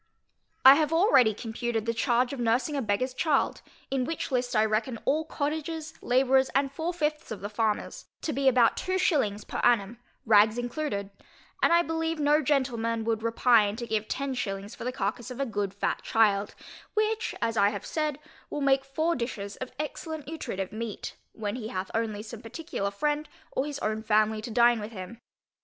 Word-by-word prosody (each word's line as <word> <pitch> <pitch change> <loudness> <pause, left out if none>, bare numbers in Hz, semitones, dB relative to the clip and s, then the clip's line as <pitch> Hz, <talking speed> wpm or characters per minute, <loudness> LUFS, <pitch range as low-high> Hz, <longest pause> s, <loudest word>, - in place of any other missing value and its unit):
I 265 - +12
have 305 +1 +1
already 325 - +5
computed 225 0 -3
the 230 - 0
charge 245 +2 +1
of 275 - -5
nursing 240 +6 +1
a 280 - 0
beggarŌĆÖs 250 +4 -1
child 300 -2 +1 0.3
(in 270 -1 +1
which 320 +2 -3
list 250 -1 0
I 215 0 +4
reckon 220 +3 -1
all 310 +3 +1
cottagers, 315 +1 -3
labourers, 265 +1 +3
and 275 0 +2
four 320 +5 -2
fifths 305 -3 -2
of 220 - -6
the 205 +1 -5
farmers) 215 -1 -1 0.2
to 310 - -1
be 275 0 0
about 245 -3 +5
two 370 0 -1
shillings 240 - +1
per - - -5
annum, 235 -1 +2 0.3
rags 215 0 +5
included; 245 -5 -3 0.5
and - - +4
I 340 0 +5
believe 325 0 -2
no 295 +1 +4
gentleman 240 -5 0
would 225 -1 -1
repine 230 -2 +3
to 235 +1 -5
give 220 -2 -1
ten 275 0 -2
shillings 200 -3 -4
for - - -8
the 250 - 0
carcass 220 +1 -3
of 250 +1 -8
a 275 - +1
good 205 -5 -2
fat 200 - -2
child, 210 -3 +2 0.4
which, 435 +2 0
as 230 0 0
I 200 -1 +4
have 205 -2 -6
said, 305 -3 -1 0.3
will 295 - -4
make 270 -1 +3
four 315 +5 0
dishes 215 -5 -4
of 255 - -6
excellent 305 +1 -5
nutritive 195 - -4
meat, 220 -1 -5 0.2
when 215 +1 -4
he 220 -4 -5
hath 185 -3 -4
only 220 -2 -2
some 225 0 -9
particular 230 -3 -4
friend, 295 +9 -1 0.2
or 270 - -1
his 290 -1 -4
own 215 0 -1
family 215 0 +2
to 225 - -6
dine 235 +1 +4
with 210 +2 -7
him. 195 +4 -8
245 Hz, 190 wpm, -28 LUFS, 215-290 Hz, 0.5 s, I